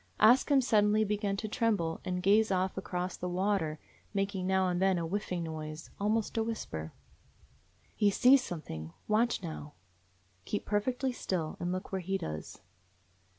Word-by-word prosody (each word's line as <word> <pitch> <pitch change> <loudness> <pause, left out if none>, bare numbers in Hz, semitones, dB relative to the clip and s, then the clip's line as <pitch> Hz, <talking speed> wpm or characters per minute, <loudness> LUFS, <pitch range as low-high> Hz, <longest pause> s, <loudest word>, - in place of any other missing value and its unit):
Ask 240 +7 +6
Him 280 -2 +5
suddenly 215 -3 +3
began 205 -1 -1
to 215 - -3
tremble 210 -8 0
and 180 0 -2
gaze 215 +3 +5
off 190 0 0
across 180 -1 -3
the 180 - -4
water, 180 -4 0 0.4
making 195 -2 -1
now 190 0 +3
and 180 0 0
then 190 -1 +3
a 170 - -1
whining 180 -1 -2
noise, 155 -1 -6
almost 215 +2 0
a - - +2
whisper. 80 - -4 1.0
"He 205 - +4
's 200 - -2
seeing 260 +3 +8
something. 85 - -6
Watch 220 -1 +2
now. 155 -3 -6 0.7
Keep 205 - -3
perfectly 250 +6 0
still, 180 -9 -3
and 175 0 -2
look 185 +1 -4
where 190 -1 -2
he 195 +2 -1
does." 75 - -6
190 Hz, 160 wpm, -31 LUFS, 175-215 Hz, 1.0 s, seeing